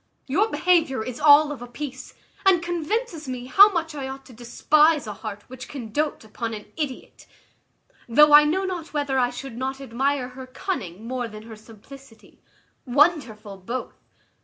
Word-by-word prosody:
Your 390 +11 +1
behaviour 325 - +1
is 255 -1 -6
all 295 0 +6
of 280 - -7
a 245 - -7
piece, 265 +1 -8 0.3
and 370 -3 +4
convinces 345 - -3
me 250 -1 -5
how 400 +11 +7
much 330 -3 -2
I 275 -3 -5
ought 270 0 -8
to 255 - -15
despise 295 +6 +2
a 210 - -5
heart 205 0 -8
which 255 0 -10
can 240 -6 -8
doat 300 +3 -2
upon 225 +1 -5
an 210 - -9
idiot; 290 -5 -6 0.8
though 300 +5 +6
I 295 0 +10
know 375 +6 0
not 350 -4 -5
whether 285 -2 0
I 245 -1 +2
should 245 0 -8
not 265 +1 -3
admire 270 +1 -1
her 260 0 -10
cunning 230 - -5
more 250 -1 -3
than 215 -1 -11
her 225 0 -10
simplicity: 225 +3 -16 0.4
wonderful 250 - +1
both! 235 +7 -6
265 Hz, 170 wpm, -24 LUFS, 235-305 Hz, 0.8 s, I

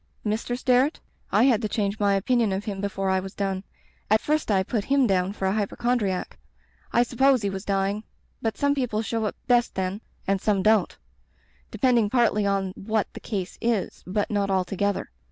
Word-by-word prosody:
"Mr. 220 +3 -1
Sterret? 255 +4 +2 0.3
I - - +4
had 245 -4 +4
to 215 - -2
change 205 -1 -1
my 200 -1 +3
opin 240 +6 +1
ion 220 -3 +1
of 195 +2 -3
him 195 -2 -4
before 195 -1 -1
I 190 - +2
was 190 +1 -8
done. 195 -1 -2 0.5
At 215 +1 +5
first 305 +1 -1
I 195 -2 +3
put 210 +1 -2
him 275 -1 +3
down 190 -3 +1
for 200 -1 -4
a 190 - +2
hypochondriac. 215 -2 -1 0.5
I 240 - +4
supposed 255 0 +3
he 200 - 0
was 195 0 -5
dying. 200 +1 0 0.4
But 225 -1 -2
some 285 0 +2
people 245 -6 -1
show 225 0 -1
up 210 - -2
best 240 -2 +2
then 190 +2 -2
— - - -36
and 195 -1 +1
some 200 -3 +1
don't; 220 0 +3 0.7
depending 240 -5 +2
partly 220 -4 +2
on 195 -1 0
what 215 +2 -2
the - - -8
case 195 -5 -4
is, 230 -4 -1
but 205 +3 -1
not 200 -1 0
altogether. 195 +2 -1
210 Hz, 195 wpm, -25 LUFS, 195-235 Hz, 0.7 s, At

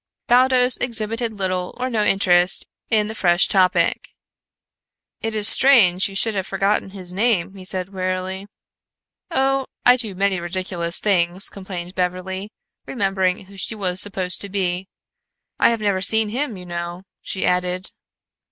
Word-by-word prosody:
Baldos 250 0 +4
exhibited 230 -1 -2
little 185 -3 -3
or 255 +1 -2
no 225 -4 -1
interest 185 -3 +2 0.2
in 215 -2 +2
the 215 - -6
fresh 175 -4 +2
topic. 180 -4 +1 1.1
"It 225 0 -3
is 210 -1 +3
strange 210 -9 +6
you 195 - -11
should 220 +3 +1
have 190 -2 -3
forgotten 195 +1 -1
his 185 -2 -7
name," 200 -3 0
he 190 -1 -12
said 185 0 -3
wearily. 185 0 -4 0.8
"Oh, 270 -4 0 0.2
I 245 0 +6
do 225 -5 -1
so - - -14
many 195 -1 0
ridiculous 175 -1 -2
things!" 185 -1 +2
complained 185 -2 -8
Beverly, 185 +2 -4 0.4
remembering 195 -5 -1
who 195 +1 -16
she 205 +4 +1
was 185 -3 -2
supposed 190 -2 +1
to 200 - -4
be. 185 -1 -2 0.7
"I - - +5
have 230 -2 -2
never 200 -3 0
seen 220 +2 +2
him, 245 -1 -3
you 180 - -10
know," 175 +1 -6 0.2
she 190 - -4
added. 180 +1 -1
195 Hz, 150 wpm, -20 LUFS, 185-220 Hz, 1.1 s, strange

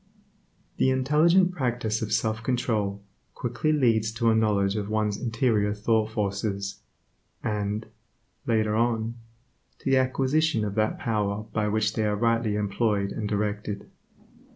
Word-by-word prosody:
The 130 - +3
intelligent 155 +8 +4
practice 120 -8 -1
of 110 - -3
self 110 0 0
control, 110 -5 -1 0.3
quickly 120 +6 -1
leads 115 -7 +2
to 115 0 +2
a - - +3
knowledge 100 -3 +2
of 105 -1 -3
one's 105 -1 0
interior 115 -3 0
thought 110 +1 +1
forces, 100 -2 -2 0.6
and, 105 0 -2 0.6
later 110 -2 +2
on, 115 0 +1 0.6
to 135 - -2
the 135 - +5
acquisition 130 0 +1
of 100 - -3
that 110 +1 0
power 105 -2 -1
by 105 -1 0
which 105 0 +1
they 110 - 0
are 105 - +1
rightly 115 -1 +1
employed 105 -1 0
and 105 -2 -3
directed. 105 0 -3
110 Hz, 135 wpm, -26 LUFS, 105-120 Hz, 0.6 s, the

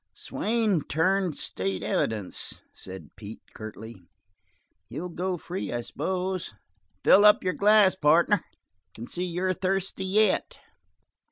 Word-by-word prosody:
"Swain 215 -6 0
turned 180 +3 0
state's 95 0 -3
evidence," 105 -4 -2
said 95 0 -10
Pete, 105 +1 -10
curtly. 110 -1 -9 0.9
"He'll 160 +10 -5
go 180 +2 -3
free, 180 +3 -5
I 120 0 -2
suppose. 185 - -3 0.5
Fill 205 - +7
up 210 0 +6
your 185 -1 0
glass, 205 +2 +5
partner. 170 +4 +3 0.5
Can 115 - -7
see 180 +8 -2
you're 180 +1 -1
thirsty 190 +1 -2
yet." 210 +3 +1
180 Hz, 115 wpm, -26 LUFS, 120-190 Hz, 0.9 s, Fill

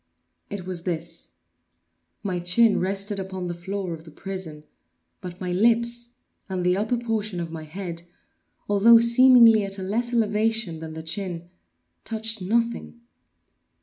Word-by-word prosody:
It 200 -3 -6
was 180 -2 -5
this: 165 - -4 0.9
my 185 -3 -2
chin 205 +6 +3
rested 195 +2 -2
upon 190 -1 -5
the 175 - -3
floor 185 +1 -4
of 160 -1 -9
the 165 - -13
prison, 165 -2 -6 0.6
but 180 0 -8
my 180 -1 -3
lips 235 +4 +2 0.4
and 185 -2 -2
the 180 0 +3
upper 220 +5 0
portion 220 -5 -2
of 165 -1 -4
my 160 -1 -7
head, 170 +1 -6 0.7
although 205 +3 +7
seemingly 235 -2 +6
at 195 0 -3
a 190 - -5
less 235 +5 -1
elevation 220 -5 0
than 160 0 -7
the 160 - -7
chin, 175 0 -4 0.5
touched 220 -1 -3
nothing. 230 +4 -1
195 Hz, 145 wpm, -24 LUFS, 175-225 Hz, 0.9 s, although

